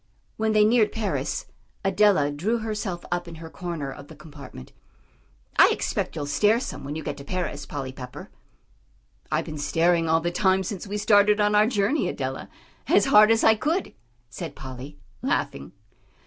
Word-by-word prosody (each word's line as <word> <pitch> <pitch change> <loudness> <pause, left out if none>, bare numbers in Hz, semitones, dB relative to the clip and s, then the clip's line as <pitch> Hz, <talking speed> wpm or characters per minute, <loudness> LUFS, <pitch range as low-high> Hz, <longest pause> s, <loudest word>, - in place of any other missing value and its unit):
When 220 0 0
they 210 0 +5
neared 220 -1 +3
Paris, 215 -4 -2 0.4
Adela 195 -6 +3
drew 190 +11 -1
herself 215 -5 -4
up 175 0 -2
in 170 - -9
her 160 0 -10
corner 170 -6 -5
of 140 +1 -11
the 160 - -13
compartment. 145 - -12 0.9
"I - - +8
expect - - -2
you'll 150 -3 -3
stare 210 +10 +2
some 250 - -6
when 140 +2 -5
you 160 - -5
get - - -4
to 140 - -9
Paris, 180 +4 -4
Polly 135 -3 -5
Pepper." 125 -1 -10 1.0
"I've - - 0
been 150 -1 -7
staring 165 +3 +2
all 165 0 +4
the 175 +1 -2
time 190 +1 +2
since 195 +1 -6
we 205 +1 -3
started 205 0 +4
on 210 0 +2
our 210 +1 +5
journey, 235 +5 +1
Adela, - - -4 0.4
as - - +4
hard 215 -5 +6
as 225 0 +3
I 220 - +7
could," 315 - -2 0.3
said 115 - -7
Polly, 130 +2 -9 0.2
laughing. 70 0 -2
180 Hz, 175 wpm, -25 LUFS, 150-210 Hz, 1.0 s, I